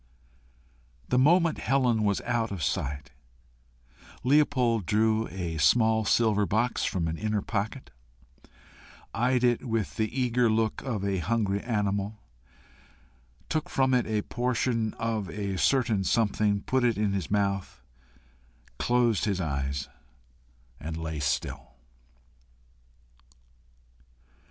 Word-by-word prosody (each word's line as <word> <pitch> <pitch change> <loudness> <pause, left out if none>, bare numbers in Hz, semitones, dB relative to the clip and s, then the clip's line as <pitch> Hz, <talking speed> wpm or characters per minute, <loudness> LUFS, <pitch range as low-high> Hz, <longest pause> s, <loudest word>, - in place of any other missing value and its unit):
The 125 - +3
moment 165 +4 +4
Helen 125 -4 +2
was 100 -1 +1
out 120 -2 -1
of 95 -6 -4
sight, 70 +2 -2 1.1
Leopold 125 - +2
drew 110 +1 +2
a 85 -4 -4
small 110 +8 +3
silver 105 -2 +2
box 115 +4 0
from 85 -3 -1
an 80 0 -3
inner 105 -2 -1
pocket, 105 - -4 1.2
eyed 125 +2 +1
it 120 -1 +2
with 115 -3 -2
the 110 -1 0
eager 125 -2 +1
look 110 0 0
of 110 -7 -3
a 100 -2 0
hungry 100 +1 0
animal, 105 -2 -1 1.3
took 155 -1 -2
from 130 -1 +2
it 125 -1 +2
a 105 -1 -1
portion 120 -2 -1
of 110 -4 -2
a 100 -2 -3
certain 115 -6 +2
something, 105 0 +1
put 130 +3 0
it 120 -3 +2
in 105 -2 0
his 95 -4 -3
mouth, 100 -2 -1 1.0
closed 120 -3 +2
his 100 -3 -1
eyes, 70 -4 -2 0.9
and 80 +2 -5
lay 80 -1 -4
still. 65 -2 -3
110 Hz, 115 wpm, -27 LUFS, 100-120 Hz, 1.3 s, moment